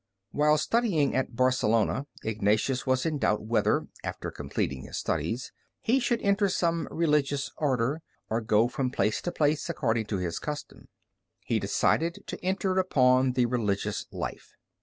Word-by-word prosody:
While 150 +1 +3
studying 175 - +1
at 130 -2 -1
Barcelona, 130 +1 +2 0.2
Ignatius 110 +5 0
was 130 +2 +2
in 155 -3 -1
doubt 105 -5 +1
whether, 110 +1 +1 0.2
after - - -4
completing 65 -2 -3
his - - -6
studies, 120 +4 -2 0.3
he 250 +4 +2
should 240 -2 +1
enter 200 0 +3
some 170 -2 0
Religious 150 -4 +1
Order, 140 0 0 0.3
or 110 +3 -1
go 110 +1 +3
from 130 +1 -2
place 105 -3 0
to 175 - -3
place, 150 -2 +1
according 115 -5 0
to 100 - -1
his 90 -2 -2
custom. 150 -1 -6 0.6
He - - +1
decided 170 +2 +1
to - - -7
enter 190 0 +1
upon 130 -7 +3
the 125 -1 +2
religious 105 -4 -1
life. - - -6
130 Hz, 150 wpm, -28 LUFS, 115-160 Hz, 0.6 s, While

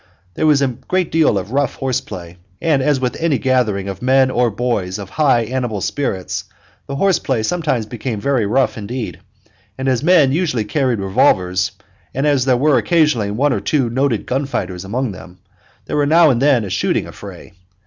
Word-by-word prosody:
There 155 - 0
was 145 -2 +4
a 135 - +2
good 180 +8 -2
deal 160 -10 +3
of 100 +3 -4
rough 140 +2 0
horse 130 -1 -1
play, 85 -1 -9 0.2
and, 155 -5 +1
as 140 0 +2
with 125 -1 -2
any 165 -3 +2
other - - -4
gathering 115 -7 +1
of 95 0 -6
men 130 +1 +3
or 125 -1 +2
boys 105 -4 -2
of 100 -2 -8
high 140 -6 +3
animal 120 -2 -2
spirits, 105 -2 -3 0.4
the 140 - -4
horse 190 +6 +2
play 125 -6 -1
sometimes 150 -5 -1
became 115 0 -5
very 125 -2 0
rough 130 +1 +1
indeed; 105 -4 -5 0.6
and 130 0 -3
as 130 -2 +2
the 155 - -4
men 160 -7 +5
usually 145 -8 0
carried 130 0 0
revolvers, 95 -1 +1 0.4
and 135 +3 0
as 140 -4 +2
there 130 -2 +3
were 145 +2 +3
occasionally 150 - +2
one 130 +7 +1
or - - -1
two 130 -6 0
noted 130 -3 0
gun 135 +2 -1
fighters 90 -8 -4
among 120 +5 -2
them, 95 -1 -12 0.5
there - - -4
was 145 -1 +2
now 165 -1 +6
and 120 -1 0
then 135 -5 +3
a 95 - -6
shooting 95 - 0
affray. - - -11
130 Hz, 200 wpm, -18 LUFS, 105-140 Hz, 0.6 s, now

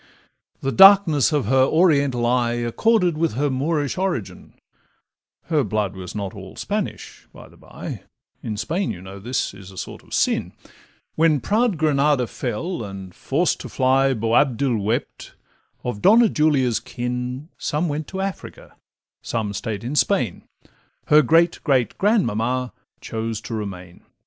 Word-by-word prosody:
The 135 - -1
darkness 195 -8 +6
of 145 -6 0
her 130 +4 +3
Oriental 140 -6 +2
eye 120 -1 +1
Accorded 170 - +1
with 165 -6 +1
her 140 +4 0
Moorish 145 +3 -1
origin 180 - -4 0.9
(Her 155 -4 +1
blood 105 -2 -2
was 90 0 -8
not 100 -2 -4
all - - -10
Spanish, - - -5
by - - -13
the - - -20
by; - - -9 0.4
In 110 -2 -5
Spain, 175 - -2
you 85 - -5
know, 95 +2 -10
this 125 +4 -2
is 100 -1 -12
a 95 - -14
sort - - -7
of - - -23
sin); - - 0 0.6
When 155 -2 +3
proud 215 - +1
Granada 145 -3 +2
fell, 125 - -4
and, 95 -3 -8
forced 155 - 0
to - - -8
fly, 135 0 +2
Boabdil 120 +2 +1
wept, 110 +4 -3 0.5
of 120 -4 -4
Donna 225 +3 +6
Julia's 140 - +2
kin 125 +4 -5
Some 155 +4 -1
went 150 0 -3
to 190 0 -5
Africa, 195 -1 -6 0.5
some 110 -3 -3
stay'd 105 0 -4
in 125 +5 -4
Spain, 130 - +1 0.7
Her 150 +1 +7
great 165 +5 +3
great 130 -5 +1
grandmamma 130 - +1 0.3
chose 110 -1 -4
to - - -7
remain. 90 -5 -6
130 Hz, 145 wpm, -22 LUFS, 115-155 Hz, 0.9 s, Her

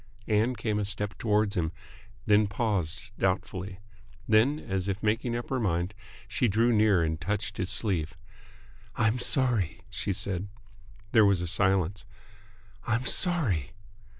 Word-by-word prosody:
Ann 110 +3 +2
came 105 -3 -1
a 105 - -1
step 105 0 -2
towards 105 -2 +1
him, 80 -2 0 0.5
then 105 0 +4
paused 100 -3 -2
doubtfully. 95 0 -2 0.5
Then, 115 +7 +4
as 95 -9 -3
if 100 +1 -3
making 115 +3 0
up 120 +2 -5
her 130 - +1
mind, 90 -3 -1 0.3
she 110 +3 +1
drew 115 +3 +2
near 105 -5 +4
and 80 0 -2
touched 105 +3 -3
his 95 -1 -2
sleeve. 90 -7 -1 0.8
"I'm 115 +3 +1
sorry," 120 - +2
she - - -3
said. 100 -1 -2 0.6
There 110 - +6
was 100 -3 +3
a - - -3
silence. 95 +2 +1 0.8
"I'm 120 +3 0
sorry!" 120 - +1
105 Hz, 140 wpm, -28 LUFS, 95-110 Hz, 0.8 s, There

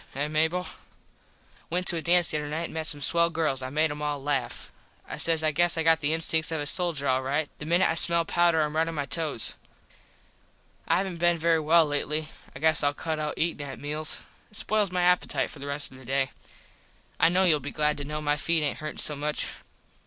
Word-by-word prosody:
Eh, 145 +2 -1
Mable? 160 +4 0 1.0
Went 180 +2 -1
to 175 - +1
a 165 - -2
dance 175 +1 +3
the 155 - 0
other 150 - -5
night 160 +3 -3
and - - -6
met 160 -1 -2
some 145 -1 0
swell 170 +3 +3
girls. 155 -5 -1
I 130 - -4
made 155 +2 +1
em 150 0 -6
all 150 -1 -1
laff. 135 -4 -3 0.4
I - - -6
says 165 -1 +2
I 155 - +2
guess 170 +2 +2
I 165 - 0
got 165 0 +4
the 145 0 0
instinks 160 0 +1
of 160 - -2
a 145 - -3
soldier 160 -2 -1
all 130 0 +2
right. 145 +4 -1
The 150 - -7
minit 175 +3 +3
I - - +1
smell 170 0 +3
powder 170 -2 +2
Im 150 0 -2
right 160 +1 +2
on 165 - -4
my 145 -2 -2
tows. 145 -3 +1 1.3
I - - +3
havent 185 -3 -3
been 175 0 +3
very 165 0 +2
well 160 +2 +4
lately. 150 +1 -1 0.3
I - - -6
guess 160 +3 +2
Ill 145 0 +1
cut 160 0 -3
out 150 -1 -3
eatin 165 -2 -1
at 135 - -7
meals. 150 +1 -1 0.3
It 210 - -5
spoils 210 -2 +1
my 180 -1 0
appitite 180 0 +1
for 145 - -10
the 140 - -7
rest 140 0 -2
of 130 - -13
the 130 - -14
day. 135 +1 0 0.9
I 165 - +5
kno 185 +2 +3
youll 160 -5 +5
be 145 +1 -6
glad 150 0 +1
to - - -4
kno 150 +2 -4
my 145 0 +1
feet 165 +1 +1
aint 145 - -2
hurtin 155 0 -6
so 150 - +1
much. 150 +1 -2
155 Hz, 235 wpm, -27 LUFS, 145-170 Hz, 1.3 s, I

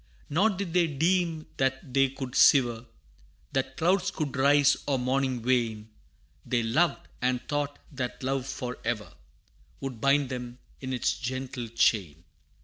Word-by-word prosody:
Nor 190 +9 +4
did 195 -4 -4
they 175 -2 +4
deem 165 +1 0
that 130 -1 -1
they 135 0 +4
could 130 -2 -7
sever, 120 -4 +5 0.6
That 135 0 -2
clouds 185 +3 +2
could 150 -8 -4
rise, 140 +1 +5
or 140 -2 +2
morning 130 -1 0
wane; 115 -4 0 0.5
They 120 -1 0
loved, 155 +10 +1
and 125 0 +1
thought 145 -1 -2
that 130 -2 -5
love 135 0 -1
for 125 -2 -5
ever 105 -3 -3 0.7
Would 130 -5 -6
bind 140 -1 +3
them 125 -1 -6 0.2
in 130 -1 -5
its 125 - +1
gentle 130 -1 -4
chain. 95 -8 +1
135 Hz, 140 wpm, -28 LUFS, 125-145 Hz, 0.7 s, sever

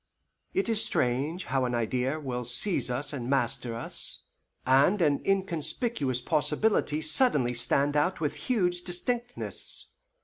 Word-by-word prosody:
It 385 - +1
is 225 -1 +5
strange 150 - 0
how 130 0 0
an 125 -1 -1
idea 125 +5 -1
will 125 -4 -4
seize 125 - -1
us 130 +5 -2
and 125 -3 -4
master 120 -3 0
us, 115 - -2 0.4
and 140 +10 +4
an 150 -5 +2
inconspicuous 180 - -1
possibility 150 0 +1
suddenly 155 - +3
stand 140 +4 +1
out 165 +6 +1
with 150 -2 -1 0.2
huge 180 -7 +1
distinctness. 240 +7 -3
150 Hz, 130 wpm, -28 LUFS, 125-190 Hz, 0.4 s, is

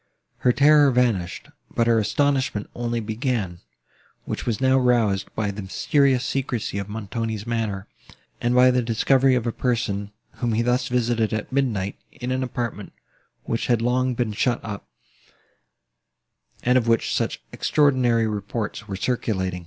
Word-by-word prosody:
Her 125 - +3
terror 145 +2 +6
vanished, 115 -9 0 0.2
but 115 - +1
her 115 -1 +4
astonishment 130 -2 0
only 120 -1 -2
began, 110 -5 -2 0.7
which - - -5
was 115 -3 0
now 130 0 +4
roused 115 -6 +2
by 105 -2 -1
the 100 +1 -6
mysterious 130 +6 +1
secrecy 125 -7 -2
of 100 +1 -5
Montoni's 110 0 -4
manner, 110 -4 -2 0.5
and 120 +1 +1
by 125 0 +6
the 125 0 +2
discovery 130 +3 +3
of 125 -2 -1
a 115 - 0
person, 110 -5 -1 0.3
whom 120 -2 -1
he 115 +2 +1
thus 125 +1 +1
visited 120 -3 0
at 110 +3 -3
midnight, 115 -8 -1
in 125 0 -5
an 130 0 0
apartment, 120 -5 -4 0.5
which 115 - -2
had 120 -2 +3
long 125 +2 +1
been 115 -2 -1
shut 120 +3 +1
up, 100 -3 -6 1.8
and 125 +1 +4
of 115 - -4
which 115 0 +2
such - - -1
extraordinary 130 -6 +2
reports 105 0 -4
were 100 - -4
circulated. 95 -4 -1
120 Hz, 150 wpm, -23 LUFS, 105-125 Hz, 1.8 s, terror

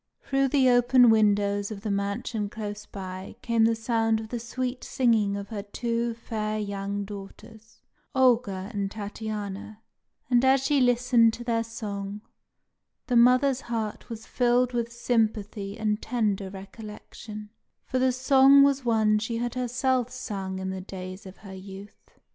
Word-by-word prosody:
Through 275 0 +1
the 265 -1 +3
open 245 -1 +6
windows 205 -2 +2
of 210 -3 -7
the 215 -1 -3
mansion 200 +2 -2
close 210 -1 -6
by 185 -1 -8
came 230 -2 +3
the 230 0 +3
sound 225 -1 +1
of 220 0 -8
the 240 - -3
sweet 250 +2 -4
singing 220 -5 +1
of 200 0 -7
her 210 -3 -4
two 230 +3 -2
fair 215 -2 -3
young 200 -1 -3
daughters, 210 +2 -12 0.3
Olga 230 -6 +2
and 200 -1 -2
Tatiana; 210 0 -6 0.4
and 245 0 +3
as 265 0 +4
she 285 -1 +2
listened 245 -2 +4
to 240 - -7
their 230 -1 0
song, 205 -3 -6 0.8
the 250 - -1
mother's 255 +2 +5
heart 225 -4 -4
was 225 0 -7
filled 245 0 +2
with 235 -1 -2
sympathy 215 -4 -1
and 215 -1 -1
tender 210 -5 -1
recollection, 210 +2 -10 0.3
for 260 - -1
the 260 0 +3
song 270 +2 +6
was 280 -1 +2
one 220 -3 +3
she 230 +2 -3
had 240 0 -2
herself 250 0 0
sung 200 -7 -5
in 190 0 -3
the 190 0 -5
days 185 0 -8
of 190 - -12
her 195 -2 -11
youth. 195 +2 -12
225 Hz, 155 wpm, -26 LUFS, 205-245 Hz, 0.8 s, open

